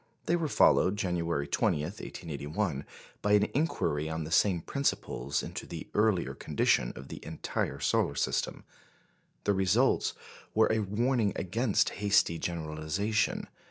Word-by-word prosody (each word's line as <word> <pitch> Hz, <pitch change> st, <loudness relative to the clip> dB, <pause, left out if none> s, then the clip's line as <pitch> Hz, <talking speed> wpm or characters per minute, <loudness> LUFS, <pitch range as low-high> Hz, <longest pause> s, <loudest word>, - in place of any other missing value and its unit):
They 170 Hz, -, +2 dB
were 165 Hz, -2 st, 0 dB
followed, 100 Hz, -7 st, +4 dB
January 85 Hz, -6 st, -1 dB
20, 75 Hz, -, +1 dB
1881, 80 Hz, -2 st, -4 dB, 0.4 s
by 105 Hz, -, +2 dB
an 105 Hz, 0 st, +6 dB
inquiry 80 Hz, -, 0 dB
on 80 Hz, 0 st, -3 dB
the 80 Hz, -, -7 dB
same 90 Hz, -1 st, +3 dB
principles 75 Hz, -, -1 dB
into -, -, -6 dB
the -, -, -7 dB
earlier 105 Hz, -4 st, +2 dB
condition -, -, +1 dB
of 70 Hz, 0 st, -10 dB
the -, -, -8 dB
entire -, -, -3 dB
solar -, -, +1 dB
system. -, -, -1 dB, 0.8 s
The 100 Hz, -, +2 dB
results 95 Hz, +7 st, +2 dB, 0.4 s
were 110 Hz, 0 st, +4 dB
a 110 Hz, -, +2 dB
warning 110 Hz, +1 st, +1 dB
against 105 Hz, +4 st, +1 dB
hasty 100 Hz, -5 st, +3 dB
generalisation. 85 Hz, +6 st, -1 dB
95 Hz, 130 wpm, -30 LUFS, 80-105 Hz, 0.8 s, an